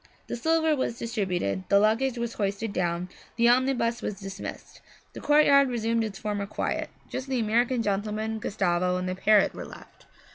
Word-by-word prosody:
The -, -, -4 dB
silver 320 Hz, +4 st, +2 dB
was 260 Hz, -4 st, -2 dB
distributed, 185 Hz, -, -2 dB
the 200 Hz, -, +5 dB
luggage 230 Hz, +5 st, +2 dB
was 235 Hz, -1 st, -3 dB
hoisted 200 Hz, +1 st, -2 dB
down, 175 Hz, -1 st, -1 dB, 0.3 s
the 235 Hz, 0 st, +3 dB
omnibus 245 Hz, -2 st, +2 dB
was 200 Hz, -, -4 dB
dismissed. 195 Hz, 0 st, -8 dB, 0.3 s
The -, -, -8 dB
courtyard 280 Hz, -2 st, +5 dB
resumed 230 Hz, -1 st, 0 dB
its 210 Hz, -3 st, -5 dB
former 205 Hz, -1 st, -3 dB
quiet; -, -, -2 dB, 0.2 s
just 260 Hz, -, -5 dB
the 260 Hz, -2 st, -1 dB
American 235 Hz, +2 st, +1 dB
gentleman, 215 Hz, +2 st, -2 dB
Gustavo 180 Hz, -3 st, 0 dB
and 180 Hz, 0 st, -3 dB
the 185 Hz, -, -1 dB
parrot 205 Hz, +2 st, +3 dB
were -, -, -7 dB
left. -, -, -14 dB
220 Hz, 170 wpm, -27 LUFS, 195-240 Hz, 0.3 s, the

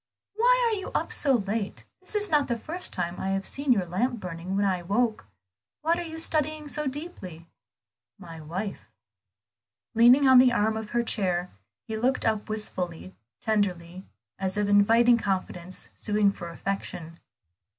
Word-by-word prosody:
"Why -, -, +3 dB
are -, -, +1 dB
you 385 Hz, -, -6 dB
up -, -, -1 dB
so 280 Hz, -3 st, +2 dB
late? 205 Hz, -2 st, -2 dB
This 370 Hz, +3 st, -4 dB
is 415 Hz, -3 st, +1 dB
not 295 Hz, -2 st, +3 dB
the 235 Hz, -, -1 dB
first 340 Hz, +9 st, -3 dB
time 175 Hz, -1 st, -1 dB
I 190 Hz, -, -2 dB
have 195 Hz, 0 st, -1 dB
seen 280 Hz, -1 st, 0 dB
your 200 Hz, -7 st, +3 dB
lamp 230 Hz, +8 st, -1 dB
burning 180 Hz, 0 st, -5 dB
when 200 Hz, +1 st, +2 dB
I 185 Hz, -2 st, 0 dB
woke. 215 Hz, -, -1 dB, 0.6 s
What 335 Hz, +2 st, +2 dB
are -, -, -2 dB
you 320 Hz, -2 st, -7 dB
studying 310 Hz, -1 st, 0 dB
so 300 Hz, 0 st, -1 dB
deeply?" 260 Hz, -, -7 dB, 0.7 s
"My 165 Hz, -3 st, -10 dB
wife." 185 Hz, +7 st, -6 dB, 1.0 s
Leaning 245 Hz, +5 st, +6 dB
on 260 Hz, -1 st, +8 dB
the 255 Hz, 0 st, +6 dB
arm 220 Hz, 0 st, +1 dB
of 220 Hz, -1 st, -5 dB
her 240 Hz, +1 st, 0 dB
chair 180 Hz, -5 st, -1 dB, 0.4 s
he 220 Hz, -, -3 dB
looked 255 Hz, +4 st, 0 dB
up 220 Hz, -2 st, 0 dB
wistfully, 185 Hz, -4 st, -3 dB, 0.3 s
tenderly, 185 Hz, -4 st, -1 dB, 0.4 s
as 190 Hz, 0 st, -1 dB
if 205 Hz, -1 st, +1 dB
inviting 230 Hz, +4 st, +5 dB
confidence, 185 Hz, -3 st, -3 dB
sueing 205 Hz, -2 st, +1 dB
for 170 Hz, -3 st, -8 dB
affection. 170 Hz, -2 st, -5 dB
215 Hz, 160 wpm, -27 LUFS, 185-260 Hz, 1.0 s, on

